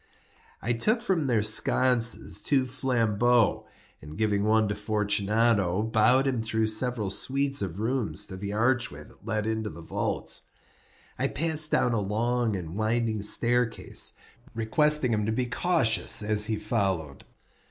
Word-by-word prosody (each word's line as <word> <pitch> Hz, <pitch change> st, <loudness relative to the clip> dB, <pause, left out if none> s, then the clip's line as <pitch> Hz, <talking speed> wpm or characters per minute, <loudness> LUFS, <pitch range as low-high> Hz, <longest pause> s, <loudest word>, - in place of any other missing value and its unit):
I 120 Hz, -, +1 dB
took 215 Hz, -, 0 dB
from 175 Hz, -, 0 dB
their 115 Hz, -4 st, +2 dB
sconces 115 Hz, +2 st, +1 dB
two 135 Hz, -3 st, +1 dB
flambeaux, 120 Hz, -3 st, +1 dB, 0.3 s
and 75 Hz, +2 st, -10 dB
giving 105 Hz, -2 st, 0 dB
one 110 Hz, 0 st, +3 dB
to -, -, 0 dB
Fortunato, 105 Hz, -1 st, +1 dB
bowed 110 Hz, +4 st, +3 dB
him 130 Hz, -4 st, 0 dB
through 110 Hz, 0 st, 0 dB
several 110 Hz, -3 st, 0 dB
suites 135 Hz, +6 st, -1 dB
of 95 Hz, -1 st, -4 dB
rooms 110 Hz, -8 st, -2 dB
to 95 Hz, -, -8 dB
the 100 Hz, +2 st, -5 dB
archway 120 Hz, +3 st, 0 dB
that 105 Hz, -, -19 dB
led 110 Hz, -1 st, -1 dB
into 110 Hz, -1 st, -2 dB
the 85 Hz, -2 st, -11 dB
vaults. -, -, -2 dB, 0.8 s
I -, -, +2 dB
passed 155 Hz, 0 st, 0 dB
down 125 Hz, -, +2 dB
a 110 Hz, -, 0 dB
long 115 Hz, +2 st, -1 dB
and 85 Hz, -3 st, -6 dB
winding 110 Hz, 0 st, 0 dB
staircase, 120 Hz, +3 st, 0 dB, 0.4 s
requesting 130 Hz, +3 st, +2 dB
him 105 Hz, -1 st, -1 dB
to -, -, 0 dB
be 125 Hz, +3 st, 0 dB
cautious 115 Hz, -, +2 dB
as 105 Hz, 0 st, +1 dB
he 110 Hz, -, 0 dB
followed. 95 Hz, -, -2 dB
110 Hz, 145 wpm, -27 LUFS, 105-125 Hz, 0.8 s, one